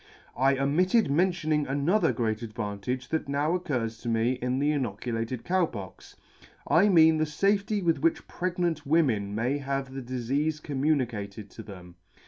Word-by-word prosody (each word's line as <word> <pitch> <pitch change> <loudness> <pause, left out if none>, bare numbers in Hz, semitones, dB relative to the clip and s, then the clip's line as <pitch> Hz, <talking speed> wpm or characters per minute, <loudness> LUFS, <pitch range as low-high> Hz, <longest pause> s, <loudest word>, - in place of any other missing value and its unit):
" - - -27
I 135 +2 +3
omitted 170 - +2
mentioning 155 -3 +1
another 145 +10 +2
great 110 -2 -1
advantage 110 +3 -4
that 160 -3 -2
now 145 +4 +1
occurs 125 -11 -2
to 120 - -5
me 115 +1 +2
in 125 0 -2
the 145 +2 +2
inoculated 115 -2 -3
Cow 180 -1 +2
Pox; 95 -8 -10 0.5
I 195 +5 +4
mean 160 -3 +6
the 155 - +2
fafety 200 +6 0
with 165 -4 +2
which 165 +3 0
pregnant 175 -3 -2
women 125 -10 +1
may 125 +6 0
have 135 -1 -3
the 135 - -5
difeafe 135 +5 -2
communicated 120 -9 -2
to - - -9
them. 90 -4 -12
140 Hz, 155 wpm, -27 LUFS, 115-160 Hz, 0.5 s, mean